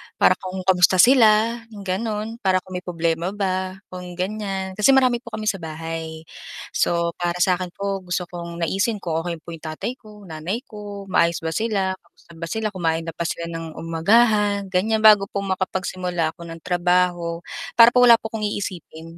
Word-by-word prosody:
Para - - +4
kung 185 0 -6
kamusta 185 0 +4
sila 225 +1 +5 0.2
'yong 200 - -9
gano'n 210 +3 -2
para 185 -4 +1
kung 185 - -16
may - - -20
problema 170 +2 -1
ba, 185 -2 -2 0.2
kung 180 -1 -8
ganiyan. 190 0 -4
Kasi 265 +6 +6
marami 255 -2 +3
po 240 - -33
kami 215 - -5
sa 210 -2 0
bahay. 160 0 -6 0.5
So 170 0 +1
para 175 0 -1
sa 180 -1 +2
akin 185 - -3
po 200 0 -2
gusto 180 -1 -3
kong 170 -1 -7
naisin 195 +6 0
ko 165 -2 -1
kung 165 - -5
okey 170 -1 -3
po - - -13
'yong 165 0 -11
tatay 195 - -4
ko, 215 - -17 0.2
nanay 165 +9 -4
ko, 205 -2 -9
maayos 170 -2 +2
ba 160 - -2
sila, 195 -1 -1
kamusta 170 -1 -24
ba 165 - -5
sila, 220 +6 -2
kumain 165 -4 -1
na 165 - -6
ba 170 - -4
sila 170 0 -3
ng 165 -1 -6
umagahan, 200 +4 +2
ganiyan. 215 +4 +1
Bago 210 -2 +7
po 200 0 -4
makapagsimula 185 -3 -2
ako 170 - -11
ng 165 0 -9
trabaho, 175 -1 +1 0.3
para 230 0 +8
po 245 0 +5
wala 235 -1 +9
po 220 - -5
akong 220 -1 -3
iisipin, 170 -5 -6
185 Hz, 190 wpm, -22 LUFS, 170-210 Hz, 0.5 s, wala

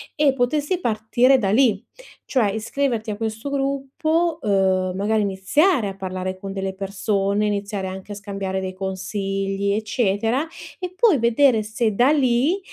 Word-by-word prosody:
e 290 -3 +3
potessi 290 +7 0
partire 240 0 +3
da 200 -5 0
lì. 220 -3 +3 0.4
Cioè 230 -7 +1
iscriverti 230 +1 -2
a 205 - -5
questo 220 +4 -4
gruppo, 280 +4 0
uhm, 190 -3 +1
magari 215 +3 +1
iniziare 205 - +2
a 195 - -7
parlare 185 -1 -4
con 195 +1 -7
delle 195 -1 -3
persone, 200 +1 -1
iniziare 200 -1 -2
anche 190 +2 -8
a - - -7
scambiare 195 -2 -4
dei 185 0 -4
consigli, 195 +1 -2
eccetera, 220 +4 0 0.3
e 365 -1 -5
poi 410 - +4
vedere 235 0 +3
se 220 +1 -1
da 245 +5 +4
lì, 275 +5 +2
215 Hz, 145 wpm, -22 LUFS, 195-265 Hz, 0.4 s, poi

